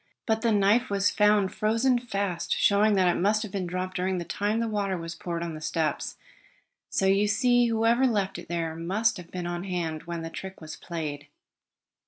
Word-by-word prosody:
But 220 Hz, -1 st, +1 dB
the 230 Hz, -, +2 dB
knife 210 Hz, +4 st, +3 dB
was 200 Hz, 0 st, +2 dB
found 210 Hz, -2 st, +3 dB
frozen 230 Hz, +4 st, +2 dB
fast, 200 Hz, -7 st, -2 dB
showing 205 Hz, +1 st, +4 dB
that 185 Hz, -2 st, +3 dB
it 175 Hz, -, +2 dB
must 215 Hz, +3 st, +2 dB
have 215 Hz, -, -7 dB
been 185 Hz, -2 st, -3 dB
dropped 185 Hz, +1 st, -4 dB
during 185 Hz, +1 st, 0 dB
the 170 Hz, -, -4 dB
time 205 Hz, +6 st, -1 dB
the 230 Hz, -, 0 dB
water 200 Hz, -3 st, -1 dB
was 165 Hz, 0 st, -6 dB
poured 170 Hz, 0 st, -4 dB
on 170 Hz, -1 st, -4 dB
the 155 Hz, -, -8 dB
steps. 155 Hz, -1 st, -2 dB, 0.7 s
So 195 Hz, -, 0 dB
you 195 Hz, +2 st, +3 dB
see 245 Hz, +3 st, +3 dB
whoever 230 Hz, +3 st, +3 dB
left 195 Hz, -6 st, -1 dB
it 175 Hz, -, -11 dB
there 165 Hz, -2 st, -2 dB
must 205 Hz, +7 st, 0 dB
have 175 Hz, -2 st, -10 dB
been 180 Hz, -1 st, -5 dB
on 175 Hz, 0 st, -3 dB
hand 170 Hz, -5 st, -3 dB
when 170 Hz, -1 st, -4 dB
the 165 Hz, -, -6 dB
trick 190 Hz, +2 st, -8 dB
was 155 Hz, -1 st, -8 dB
played." 150 Hz, -4 st, -5 dB
195 Hz, 205 wpm, -27 LUFS, 170-215 Hz, 0.7 s, showing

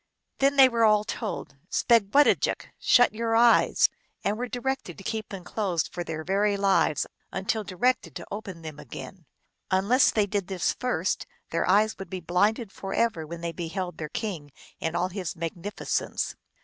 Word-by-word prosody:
Then 275 Hz, +1 st, +3 dB
they 270 Hz, -1 st, +9 dB
were 235 Hz, -2 st, +1 dB
all 210 Hz, -1 st, +5 dB
told 210 Hz, -, -5 dB
" -, -, -39 dB
Spegwedajik! 235 Hz, +4 st, +3 dB
" -, -, -40 dB
" -, -, -46 dB
Shut 245 Hz, -3 st, +5 dB
your 225 Hz, +1 st, 0 dB
eyes! 235 Hz, 0 st, +5 dB, 0.2 s
" -, -, -41 dB
and 205 Hz, -, +1 dB
were 245 Hz, +3 st, -3 dB
directed 245 Hz, -7 st, -3 dB
to -, -, -11 dB
keep 220 Hz, +2 st, -3 dB
them 195 Hz, -3 st, -7 dB
closed 185 Hz, -4 st, -2 dB
for 175 Hz, -, -3 dB
their 160 Hz, -2 st, -5 dB
very 200 Hz, +3 st, +1 dB
lives, 195 Hz, -6 st, +2 dB, 0.3 s
until 200 Hz, +3 st, -1 dB
directed 225 Hz, +7 st, 0 dB
to -, -, -6 dB
open 195 Hz, -5 st, -6 dB
them 155 Hz, -2 st, -8 dB
again. 175 Hz, -6 st, -10 dB, 0.4 s
Unless 200 Hz, +8 st, +4 dB
they 210 Hz, -2 st, +2 dB
did 200 Hz, -2 st, -2 dB
this 190 Hz, -3 st, 0 dB
first, 190 Hz, -8 st, -1 dB, 0.2 s
their 165 Hz, +2 st, 0 dB
eyes 215 Hz, +3 st, +3 dB
would 195 Hz, -3 st, -7 dB
be 185 Hz, -, -4 dB
blinded 200 Hz, +6 st, +1 dB
forever 195 Hz, -4 st, -1 dB
when 170 Hz, +1 st, -7 dB
they 170 Hz, 0 st, -2 dB
beheld 175 Hz, +2 st, -5 dB
their 155 Hz, -1 st, -4 dB
king 175 Hz, -9 st, -4 dB, 0.3 s
in 165 Hz, +1 st, -2 dB
all 180 Hz, +1 st, +1 dB
his 185 Hz, -3 st, -4 dB
magnif 170 Hz, +4 st, -5 dB
icence. -, -, -2 dB
195 Hz, 185 wpm, -27 LUFS, 175-225 Hz, 0.4 s, they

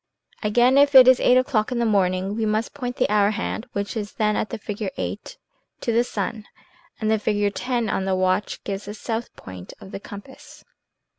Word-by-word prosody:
Again, 240 Hz, +5 st, +4 dB
if 285 Hz, 0 st, +4 dB
it 255 Hz, -1 st, +10 dB
is 255 Hz, -1 st, +6 dB
eight 250 Hz, -, +4 dB
o'clock 255 Hz, -3 st, +1 dB
in 250 Hz, -, -1 dB
the 235 Hz, -, +1 dB
morning, 190 Hz, -2 st, +1 dB
we 225 Hz, -, -2 dB
must 215 Hz, +1 st, -1 dB
point 245 Hz, -3 st, -5 dB
the -, -, +1 dB
hour 205 Hz, -1 st, +3 dB
hand 220 Hz, +2 st, -4 dB
(which 200 Hz, -1 st, -3 dB
is 210 Hz, -2 st, -4 dB
then 210 Hz, -1 st, +1 dB
at -, -, -2 dB
the -, -, -4 dB
figure 210 Hz, -1 st, -5 dB
VIII) -, -, -3 dB, 0.6 s
to 235 Hz, -, -2 dB
the 230 Hz, +1 st, +3 dB
sun, 215 Hz, -1 st, -4 dB, 0.5 s
and 215 Hz, -1 st, 0 dB
the 220 Hz, -, +2 dB
figure 205 Hz, -1 st, +1 dB
X -, -, -5 dB
on 230 Hz, -6 st, 0 dB
the 190 Hz, -1 st, +1 dB
watch 185 Hz, +2 st, 0 dB
gives 200 Hz, 0 st, -5 dB
the 205 Hz, +1 st, -7 dB
south 225 Hz, +2 st, -4 dB
point 95 Hz, -1 st, -10 dB
of 190 Hz, -, -12 dB
the -, -, -6 dB
compass. 205 Hz, +6 st, -12 dB
215 Hz, 210 wpm, -23 LUFS, 200-235 Hz, 0.6 s, it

